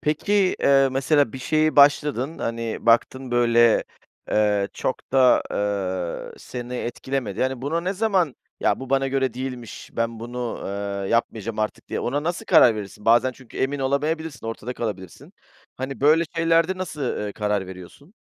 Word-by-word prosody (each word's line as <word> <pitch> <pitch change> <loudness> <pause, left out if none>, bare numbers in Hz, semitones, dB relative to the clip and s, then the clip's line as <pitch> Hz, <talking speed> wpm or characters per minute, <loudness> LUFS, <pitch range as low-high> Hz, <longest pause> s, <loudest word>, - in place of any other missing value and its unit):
Peki, 155 +7 -1 0.3
eee, 135 -1 +5
mesela 140 -1 +2
bir - - -6
şeye 155 +4 +1
başladın, 145 0 +4
hani, 115 0 -4
baktın, 125 +2 +2
böyle, 120 -1 +4 0.5
eee, 105 -2 +2
çok 130 - -4
da, 130 -2 +5 0.9
eee, - - -15
seni 125 0 -7
etkilemedi. 120 -3 -3
Yani, 130 -1 -1
buna 160 +4 -1
ne 180 +3 -2
zaman, 190 - +1 0.2
"Ya, - - +1
bu 130 -1 -8
bana 135 0 +2
göre 135 -2 0
değilmiş, 125 -2 -7
ben 115 -1 -2
bunu, 120 0 -5
eee, 100 0 -4
yapmayacağım 115 -2 -1
artık" 110 0 -3
diye - - -3
ona 145 +4 -1
nasıl 170 +2 -3
karar 115 -3 +6
verirsin? 105 0 -8
Bazen 120 +3 +4
çünkü 130 -1 -15
emin 140 +2 0
olamayabilirsin, 145 +1 -2
ortada 115 +2 -5
kalabilirsin. 95 -6 -6 0.4
Hani, 130 +1 -5
böyle 155 +4 +5
şeylerde 165 +2 +2
nasıl, 175 -5 -5
ııı, 105 -6 -2
karar 105 -2 -1
veriyorsun? 95 - -12
130 Hz, 155 wpm, -23 LUFS, 115-145 Hz, 0.9 s, karar